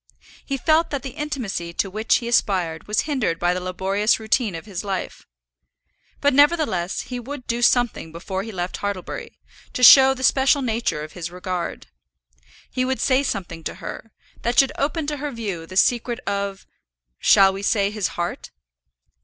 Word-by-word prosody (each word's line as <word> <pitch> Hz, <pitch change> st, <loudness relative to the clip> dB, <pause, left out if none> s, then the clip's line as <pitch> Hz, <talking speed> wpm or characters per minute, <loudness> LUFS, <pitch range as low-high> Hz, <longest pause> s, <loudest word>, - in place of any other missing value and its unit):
He 275 Hz, -, -3 dB
felt 315 Hz, +5 st, +2 dB
that 280 Hz, -2 st, -4 dB
the 265 Hz, -, -5 dB
intimacy 245 Hz, -, -4 dB
to 195 Hz, -, -1 dB
which 215 Hz, +4 st, +1 dB
he 235 Hz, -, -2 dB
aspired 180 Hz, -8 st, 0 dB
was 210 Hz, +1 st, +1 dB
hindered 260 Hz, -, -1 dB
by 175 Hz, +1 st, +1 dB
the 180 Hz, -, -2 dB
laborious 190 Hz, +4 st, 0 dB
routine 220 Hz, -2 st, 0 dB
of 165 Hz, -, -8 dB
his 195 Hz, -3 st, -6 dB
life; 195 Hz, -2 st, -5 dB, 0.9 s
but 285 Hz, -1 st, +2 dB
nevertheless 285 Hz, -, +2 dB
he 250 Hz, -1 st, -6 dB
would 255 Hz, +1 st, -8 dB
do 235 Hz, +1 st, -2 dB
something 240 Hz, -9 st, +2 dB
before 185 Hz, +3 st, -4 dB
he 225 Hz, +3 st, -7 dB
left 180 Hz, -2 st, -4 dB
Hartlebury, 200 Hz, -3 st, -5 dB, 0.4 s
to 250 Hz, -, -2 dB
show 265 Hz, +1 st, +9 dB
the 260 Hz, -, -7 dB
special 270 Hz, +1 st, +3 dB
nature 220 Hz, -10 st, -1 dB
of 155 Hz, -, -10 dB
his 170 Hz, -2 st, -5 dB
regard. 180 Hz, -1 st, -5 dB, 0.9 s
He 255 Hz, -, -1 dB
would 260 Hz, +1 st, -1 dB
say 260 Hz, 0 st, +3 dB
something 180 Hz, -10 st, -4 dB
to -, -, -4 dB
her, 225 Hz, -, -8 dB, 0.3 s
that 240 Hz, +2 st, -1 dB
should 270 Hz, -1 st, +5 dB
open 305 Hz, +2 st, -1 dB
to 295 Hz, 0 st, -3 dB
her 295 Hz, +1 st, -4 dB
view 200 Hz, -10 st, -5 dB
the 185 Hz, -, -6 dB
secret 240 Hz, +3 st, +2 dB
of 200 Hz, -2 st, -3 dB, 0.5 s
shall 195 Hz, -2 st, +5 dB
we 195 Hz, -, -6 dB
say 200 Hz, 0 st, +1 dB
his 210 Hz, -3 st, -1 dB
heart? 175 Hz, 0 st, -4 dB
215 Hz, 175 wpm, -22 LUFS, 185-260 Hz, 0.9 s, show